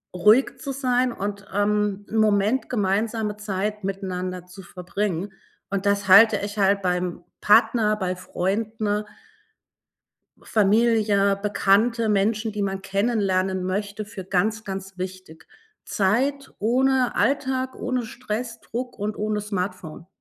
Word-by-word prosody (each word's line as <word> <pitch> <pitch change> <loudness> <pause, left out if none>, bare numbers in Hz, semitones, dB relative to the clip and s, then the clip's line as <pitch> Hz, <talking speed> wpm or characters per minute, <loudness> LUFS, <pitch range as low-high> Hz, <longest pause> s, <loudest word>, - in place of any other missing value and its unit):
ruhig 210 +9 +4
zu 280 - -5
sein 255 -2 +1
und, 200 -2 -5
ähm, 205 0 0
'n 225 - -2
Moment 215 +3 +2
gemeinsame 210 0 0
Zeit 210 0 -3
miteinander 185 -2 -4
zu 180 +2 -12
verbringen. 185 +1 -4 0.4
Und 200 0 -2
das 200 0 +1
halte 220 +4 +8
ich 205 +1 -5
halt 200 0 +3
beim 180 -1 -1 0.2
Partner, 215 0 +4
bei 185 -2 -2
Freunden 210 +3 -2 1.4
Familie, 210 -2 +2
Bekannte, 220 +3 +2
Menschen, 215 +2 +1
die 210 0 -3
man 195 -1 -2
kennenlernen 195 -2 0
möchte, 205 +3 -3
für 195 -3 -8
ganz, 210 +4 0
ganz 195 0 -6
wichtig. 185 -3 -8 0.4
Zeit 265 +8 0
ohne 255 +3 +2
Alltag, 260 -2 0
ohne 250 -1 -2
Stress, 230 0 -5
Druck 245 0 -6
und 210 +1 -3
ohne 210 0 -1
Smartphone. 185 -5 -5
205 Hz, 120 wpm, -24 LUFS, 195-225 Hz, 1.4 s, halte